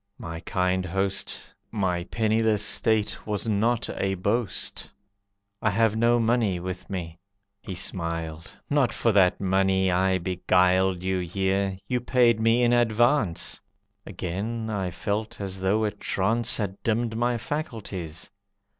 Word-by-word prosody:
"My 80 Hz, 0 st, -6 dB
kind 90 Hz, +2 st, 0 dB
host, 95 Hz, +2 st, -2 dB, 0.2 s
My 90 Hz, -5 st, -1 dB
penniless 110 Hz, -1 st, +1 dB
state 105 Hz, +1 st, +1 dB
was 105 Hz, +1 st, -2 dB
not 110 Hz, +3 st, +1 dB
a 95 Hz, 0 st, -1 dB
boast; 105 Hz, +3 st, -1 dB, 0.7 s
I 110 Hz, -, +2 dB
have 110 Hz, +2 st, +2 dB
no 120 Hz, +1 st, +3 dB
money 115 Hz, -5 st, +1 dB
with 90 Hz, +1 st, -6 dB
me." 85 Hz, -4 st, -5 dB, 0.4 s
He 95 Hz, -, -6 dB
smiled. 85 Hz, -2 st, -3 dB, 0.2 s
"Not 140 Hz, -4 st, +2 dB
for 115 Hz, -, +1 dB
that 95 Hz, -3 st, +4 dB
money 95 Hz, 0 st, +2 dB
I 95 Hz, +1 st, +2 dB
beguiled 90 Hz, 0 st, +2 dB
You 95 Hz, 0 st, 0 dB
here; 95 Hz, +2 st, -1 dB
you 125 Hz, -, 0 dB
paid 120 Hz, -2 st, +3 dB
me 115 Hz, +2 st, +3 dB
in 120 Hz, 0 st, +4 dB
advance." 120 Hz, -, +2 dB, 0.4 s
Again 110 Hz, +6 st, -4 dB
I 95 Hz, -3 st, -1 dB
felt 105 Hz, +5 st, -3 dB
as 95 Hz, -1 st, -4 dB
though 100 Hz, +4 st, +2 dB
a 105 Hz, -, +1 dB
trance 105 Hz, +3 st, 0 dB
Had 100 Hz, -3 st, -4 dB
dimmed 115 Hz, 0 st, 0 dB
my 120 Hz, +1 st, +1 dB
faculties. 105 Hz, -, -5 dB
100 Hz, 135 wpm, -26 LUFS, 95-115 Hz, 0.7 s, that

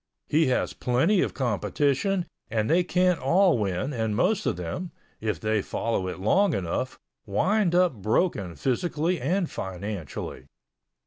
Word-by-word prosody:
He 155 Hz, 0 st, +3 dB
has 130 Hz, -, 0 dB
plenty 160 Hz, +11 st, +2 dB
of -, -, -1 dB
competition 140 Hz, -, 0 dB, 0.2 s
and 110 Hz, -1 st, 0 dB
they 175 Hz, +3 st, +3 dB
can't 180 Hz, 0 st, +2 dB
all 170 Hz, +2 st, +3 dB
win 100 Hz, +7 st, -1 dB
and 110 Hz, -3 st, -1 dB
most 215 Hz, -, +1 dB
of -, -, 0 dB
them, 90 Hz, -, -4 dB, 0.3 s
if 110 Hz, -1 st, -2 dB
they 110 Hz, -1 st, +1 dB
follow 95 Hz, -2 st, -2 dB
it 90 Hz, -, -4 dB
long 185 Hz, -, +3 dB
enough, 85 Hz, -3 st, -2 dB, 0.3 s
wind 185 Hz, -, +2 dB
up 180 Hz, -3 st, +4 dB
broken 105 Hz, -, 0 dB
physically 160 Hz, -, -1 dB
and 175 Hz, +7 st, +1 dB
financially. 95 Hz, -, -6 dB
130 Hz, 140 wpm, -26 LUFS, -, 0.3 s, up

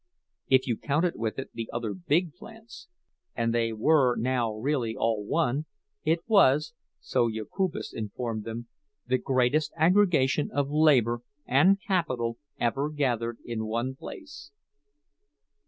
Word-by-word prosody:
If 130 Hz, -1 st, +4 dB
you 120 Hz, -4 st, -1 dB
counted 160 Hz, +5 st, 0 dB
with 110 Hz, -2 st, -3 dB
it 135 Hz, -, -6 dB
the 115 Hz, -1 st, -5 dB
other 115 Hz, -3 st, -3 dB
big 150 Hz, -, 0 dB
plants—and 225 Hz, -, -8 dB
they 115 Hz, -1 st, +1 dB
were 125 Hz, +2 st, +3 dB
now 120 Hz, -1 st, 0 dB
really 115 Hz, 0 st, -1 dB
all 110 Hz, -2 st, 0 dB
one—it 150 Hz, +7 st, -2 dB
was, 155 Hz, -, +4 dB, 0.3 s
so 120 Hz, -2 st, +1 dB
Jokubas 115 Hz, -, -3 dB
informed 110 Hz, +1 st, -4 dB
them, 115 Hz, +1 st, -6 dB, 0.4 s
the 130 Hz, +1 st, +1 dB
greatest 130 Hz, +4 st, +1 dB
aggregation 160 Hz, -5 st, +3 dB
of 145 Hz, 0 st, -1 dB
labor 130 Hz, -7 st, +3 dB, 0.2 s
and 185 Hz, +10 st, +4 dB
capital 130 Hz, -, -1 dB, 0.2 s
ever 135 Hz, +5 st, 0 dB
gathered 120 Hz, -6 st, -1 dB
in 110 Hz, -2 st, -3 dB
one 120 Hz, +4 st, -2 dB
place. 140 Hz, +1 st, -10 dB
130 Hz, 120 wpm, -27 LUFS, 115-155 Hz, 0.4 s, If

